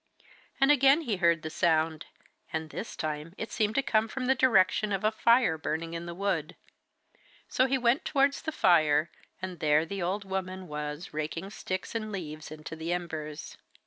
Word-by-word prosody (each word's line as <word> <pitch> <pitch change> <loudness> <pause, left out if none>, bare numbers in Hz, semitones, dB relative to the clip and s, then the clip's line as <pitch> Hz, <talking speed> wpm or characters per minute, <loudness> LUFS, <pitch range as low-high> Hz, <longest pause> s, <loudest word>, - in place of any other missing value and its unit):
And 270 +1 +5
again 275 +2 +5
he 230 -10 -2
heard 170 -2 +3
the 160 - -4
sound, 160 -2 +1 0.4
and 160 -1 -3
this 225 - -6
time 155 +2 -4
it 220 -1 -5
seemed 215 0 0
to 275 - +2
come 220 -3 +2
from 255 +3 -4
the 260 - +4
direction 215 -5 +3
of 195 0 -1
a 215 - +3
fire 230 -6 +3
burning 165 +1 -3
in 170 +1 -5
the 170 - -6
wood. 185 -5 -1 0.9
So 255 - +2
he 265 +1 +2
went 245 +2 +2
towards 280 0 +2
the 315 - -3
fire, 155 - +3 0.3
and 185 -3 -5
there 150 +1 +3
the 195 +3 -5
old 195 +4 -2
woman 190 -1 -4
was 150 +3 -5
raking 160 +5 -4
sticks 185 -3 -4
and 215 -2 -3
leaves 155 -6 -6
into 155 +1 -8
the 160 +2 -4
embers. 160 -3 -5
185 Hz, 180 wpm, -29 LUFS, 160-220 Hz, 0.9 s, And